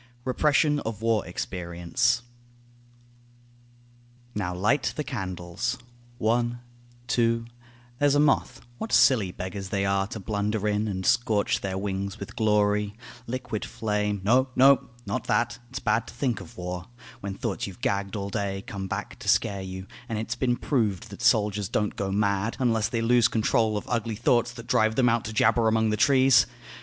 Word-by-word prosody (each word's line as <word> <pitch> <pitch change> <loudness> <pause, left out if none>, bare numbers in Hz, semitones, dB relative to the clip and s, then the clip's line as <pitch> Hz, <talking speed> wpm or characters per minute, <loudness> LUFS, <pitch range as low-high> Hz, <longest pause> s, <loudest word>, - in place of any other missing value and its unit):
REPRESSION 150 +3 +2
OF 110 -4 -5
WAR 115 -3 +1
EXPERIENCE 90 +5 -1 2.1
Now 105 -4 -2
light 120 +10 +1
the 150 - -2
candles; 95 - -3 0.4
one; 120 +1 +1 0.5
two; 115 -1 +1 0.5
there's 145 -1 +4
a - - +4
moth; 150 -2 +2 0.2
What 220 - -4
silly 110 -9 +5
beggars 95 +2 -6
they 100 -1 0
are 100 0 +1
to 110 - -6
blunder 105 +1 -1
in 105 +1 0
And 95 -2 -3
scorch 115 -4 +2
their 95 -1 -3
wings 100 0 -3
with 100 - -8
glory, 105 -1 +2 0.3
liquid 120 -3 -4
flame 105 -2 -2
No, 130 +6 +3
no, 135 +1 +5 0.2
not 130 - -3
that, 120 +2 0
it's 130 - -6
bad 115 0 0
to - - -11
think 125 -2 -1
of 120 - -13
war, 90 0 -5 0.3
When 100 -4 -5
thoughts 105 -2 -3
you've 100 +5 -11
gagged 100 -6 -1
all 100 -1 -4
day 100 -2 -2
come 95 -1 -5
back - - -5
to - - -9
scare 100 -1 +2
you; 95 0 -6 0.2
And 115 - -2
it's 110 +2 -2
been 125 -1 +1
proved 110 - -1
that - - -9
soldiers 105 -2 +2
don't 105 -1 -1
go 95 -1 -2
mad 100 +2 0
Unless 115 -4 +1
they 115 -2 -1
lose 120 +1 +4
control 110 -1 +1
of 105 - -5
ugly 115 -2 -1
thoughts 120 +2 +2
That 120 -1 -10
drive 110 -3 +2
them 125 -1 +4
out 115 -1 +1
to 110 - -4
jabber 115 +1 +3
among 110 0 +2
the - - +1
trees. 130 -1 +5
110 Hz, 170 wpm, -26 LUFS, 100-120 Hz, 2.1 s, silly